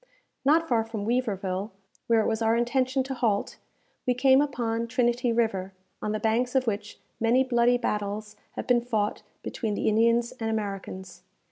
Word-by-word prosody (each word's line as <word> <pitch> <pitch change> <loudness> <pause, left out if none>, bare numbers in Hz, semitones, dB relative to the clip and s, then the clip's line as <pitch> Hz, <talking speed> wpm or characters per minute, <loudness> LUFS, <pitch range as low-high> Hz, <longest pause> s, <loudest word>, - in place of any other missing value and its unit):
Not 320 +4 +4
far 230 -5 +2
from 220 -2 -5
Weaverville, 205 -5 -1 0.4
where 230 -1 +4
it - - 0
was 220 0 -1
our 225 0 +3
intention 255 +2 +1
to 265 +1 -4
halt, 230 -5 0 0.5
we 250 - +3
came 265 +2 +5
upon 235 -5 -1
Trinity 240 0 +1
River, 195 -5 0 0.3
on 210 - -2
the 215 - -1
banks 235 +4 0
of 260 -1 +3
which 210 -2 -3 0.2
many 235 +3 +3
bloody 245 -1 +3
battles 210 -1 -3 0.2
have - - -5
been 245 -1 +3
fought 220 -4 -1 0.2
between 215 -3 -3
the - - -1
Indians 230 +2 +3
and 225 -1 -2
Americans. 195 -4 -5
230 Hz, 165 wpm, -27 LUFS, 210-245 Hz, 0.5 s, came